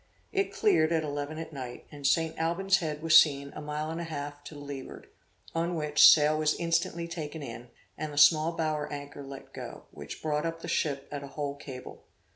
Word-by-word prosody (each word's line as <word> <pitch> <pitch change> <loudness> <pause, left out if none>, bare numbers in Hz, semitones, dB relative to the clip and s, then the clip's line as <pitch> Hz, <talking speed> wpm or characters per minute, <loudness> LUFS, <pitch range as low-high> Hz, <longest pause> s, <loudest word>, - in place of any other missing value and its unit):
It 395 -1 0
cleared 275 - +3
at 160 -1 +2
eleven 145 +1 -4
at 160 0 -7
night, 125 -3 -7
and 145 -1 -2
St. 160 +3 +2
Alban's 185 +4 +2
Head 155 -4 -4
was 165 0 +9
seen 140 -2 -2
a - - -6
mile 150 +1 -3
and 165 +1 -4
a - - -4
half 145 -2 -6
to 155 - -9
the - - -9
leeward, 140 -2 -8 0.5
on 170 +1 -1
which, 150 -2 +7
sail 155 0 +5
was 155 0 +2
instantly 170 0 0
taken 160 -2 -6
in, 120 -1 -8 0.3
and 155 -1 -3
the 145 - -9
small 155 +3 +6
bower 155 -2 -1
anchor 145 0 -7
let 135 -1 -10
go, - - -8
which - - -9
brought 150 -1 0
up 165 0 -4
the - - -5
ship 140 -2 -1
at 145 -1 -4
a 140 - -7
whole 145 0 -4
cable. 135 -3 -10
150 Hz, 210 wpm, -29 LUFS, 145-165 Hz, 0.5 s, was